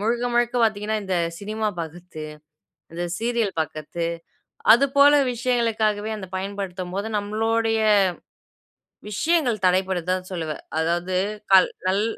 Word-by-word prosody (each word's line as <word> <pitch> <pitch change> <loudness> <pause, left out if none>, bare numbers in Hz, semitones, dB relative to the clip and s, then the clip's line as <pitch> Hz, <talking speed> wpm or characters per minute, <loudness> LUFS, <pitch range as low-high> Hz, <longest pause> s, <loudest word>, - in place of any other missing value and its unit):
முழுக்க, 235 +3 0
முழுக்க 240 0 +2
பார்த்தீங்கன்னா, 215 0 +1
இந்த 190 -2 -1 0.2
சினிமா 215 +2 -3
பார்க்கிறது, 165 0 -7 0.7
இந்த 175 +1 -3 0.2
சீரியல் 230 -3 0
பார்க்கிறது 155 +2 -3 0.7
அதுபோல 280 +3 +5 0.2
விஷயங்களுக்காகவே 225 -4 0
அந்த 190 -3 -7
பயன்படுத்தும்போது 195 0 -4
நம்மளோடைய 225 +2 0 1.3
விஷயங்கள் 245 - +1
தடைபடுது 185 -1 +1
தான் 185 0 -3
சொல்லுவேன். 160 -4 -4 0.2
அதாவது, 175 +3 -1 0.4
கல் 190 -1 +7 0.2
நல் 195 +3 +2
205 Hz, 105 wpm, -23 LUFS, 180-225 Hz, 1.3 s, கல்